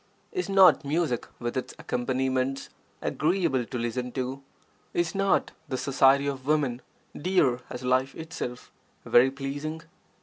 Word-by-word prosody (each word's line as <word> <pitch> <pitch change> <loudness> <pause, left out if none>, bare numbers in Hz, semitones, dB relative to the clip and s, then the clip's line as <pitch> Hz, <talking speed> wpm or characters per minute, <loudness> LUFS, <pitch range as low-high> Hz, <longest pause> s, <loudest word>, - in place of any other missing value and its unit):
Is 370 - -3
not 195 -4 +6
music 145 -4 -1
with 120 +1 -4
its 130 - -4
accompaniments 130 +2 -1 0.3
agreeable 155 -7 +1
to 125 - -5
listen 125 +1 -2
to? 130 +1 -3 0.5
Is 175 -1 +1
not 195 0 +1 0.2
the 130 - -1
society 135 +1 +4
of 135 -2 -4
women, 140 -5 +1 0.3
dear 150 -8 +2
as 125 - -7
life 130 +2 +1
itself, 160 -6 -6 0.3
very 125 +2 +6
pleasing? 145 +4 -5
135 Hz, 130 wpm, -27 LUFS, 125-155 Hz, 0.5 s, not